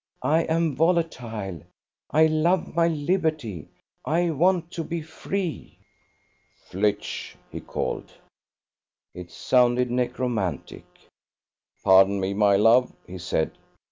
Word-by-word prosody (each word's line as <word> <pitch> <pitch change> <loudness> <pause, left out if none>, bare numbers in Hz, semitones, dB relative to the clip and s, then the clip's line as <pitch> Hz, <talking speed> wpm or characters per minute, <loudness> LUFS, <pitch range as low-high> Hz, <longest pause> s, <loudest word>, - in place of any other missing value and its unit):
I 160 +2 +3
am 160 -2 0
volatile. 120 - -1 0.5
I 155 +1 +4
love 160 +4 +1
my 170 0 +3
liberty. 155 - -1 0.4
I 170 +2 +1
want 175 +2 +1
to 165 - -4
be 165 0 -4
free.. 170 +2 -5 0.4
." - - -41
"Flitch!" 100 +2 -2 0.2
he - - -6
called. - - -4 1.0
It 90 -1 -9
sounded 125 +4 +2
necromantic. 120 - -2 1.0
"Pardon 95 +1 +5
me, 95 +1 -1
my 100 0 +3
love," 115 +5 +4
he 90 +1 -9
said. 80 -3 -1
125 Hz, 110 wpm, -25 LUFS, 100-165 Hz, 1.0 s, Pardon